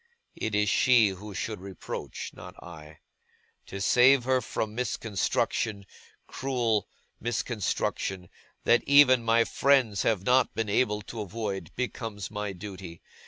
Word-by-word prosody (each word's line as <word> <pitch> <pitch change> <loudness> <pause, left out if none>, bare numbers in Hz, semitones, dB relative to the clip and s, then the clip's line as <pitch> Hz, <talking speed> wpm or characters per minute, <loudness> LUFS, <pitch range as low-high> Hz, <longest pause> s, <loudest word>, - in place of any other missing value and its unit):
It 110 -1 -3
is 105 0 +2
she 120 -3 +4
who 100 +2 -8
should 105 -2 -4
reproach; 95 -2 -7
not - - -11
I. 80 -2 -12 0.7
To 100 - -7
save 125 +6 +5
her 130 0 +2
from 110 -1 -3
misconstruction, 110 -2 -1 0.4
cruel 120 -6 -1 0.3
misconstruction, 105 -5 -2 0.4
that 120 - +4
even 140 -3 +7
my 115 0 +4
friends 125 -7 +2
have 105 -5 +1
not 125 +4 +3
been 110 -2 -2
able 105 -1 +1
to 110 +1 -7
avoid, 100 -3 -4
becomes 115 -6 -4
my 105 -1 -3
duty. 95 -3 -9
110 Hz, 125 wpm, -28 LUFS, 100-120 Hz, 0.7 s, even